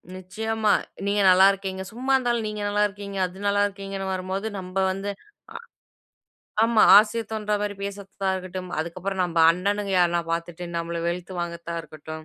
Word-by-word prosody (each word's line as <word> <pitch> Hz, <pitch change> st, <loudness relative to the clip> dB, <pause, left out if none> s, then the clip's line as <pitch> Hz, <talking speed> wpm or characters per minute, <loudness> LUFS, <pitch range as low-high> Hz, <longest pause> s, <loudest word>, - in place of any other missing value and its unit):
நிச்சயமா. 215 Hz, +4 st, -1 dB, 0.4 s
நீங்க 205 Hz, 0 st, +2 dB
நல்லா 185 Hz, +1 st, +7 dB
இருக்கீங்க. 190 Hz, -1 st, -5 dB
சும்மா 255 Hz, +4 st, -3 dB
இருந்தாலும் 240 Hz, -3 st, 0 dB
நீங்க 210 Hz, 0 st, -5 dB
நல்லா 205 Hz, 0 st, +2 dB
இருக்கீங்க, 200 Hz, -1 st, -8 dB
அது 185 Hz, +2 st, -8 dB
நல்லா 200 Hz, 0 st, +2 dB
இருக்கீங்கன்னு 195 Hz, -1 st, -6 dB
வரும்போது 190 Hz, +3 st, -3 dB
நம்ம 185 Hz, 0 st, -9 dB, 0.2 s
வந்து 195 Hz, +2 st, -4 dB, 0.4 s
அ -, -, -6 dB, 1.1 s
ஆமா. 230 Hz, -1 st, +4 dB, 0.2 s
ஆசை 215 Hz, +2 st, +2 dB
தோன்ற 210 Hz, -1 st, -1 dB
மாரி 205 Hz, 0 st, -2 dB
பேசுறத்தாகட்டும். 190 Hz, -2 st, -4 dB
அதுக்கப்புறம் 185 Hz, +4 st, -3 dB
நம்ப 170 Hz, -1 st, -2 dB
அண்ணனுங்க 200 Hz, +3 st, -1 dB
யார்னா 175 Hz, -1 st, +3 dB
பார்த்துட்டு. 170 Hz, +1 st, -4 dB
நம்மள 170 Hz, 0 st, -3 dB
வெலுத்து 175 Hz, +2 st, -3 dB
வாங்கறத்த 170 Hz, 0 st, -5 dB
இருக்கட்டும். 155 Hz, 0 st, -9 dB
195 Hz, 145 wpm, -25 LUFS, 180-205 Hz, 1.1 s, நல்லா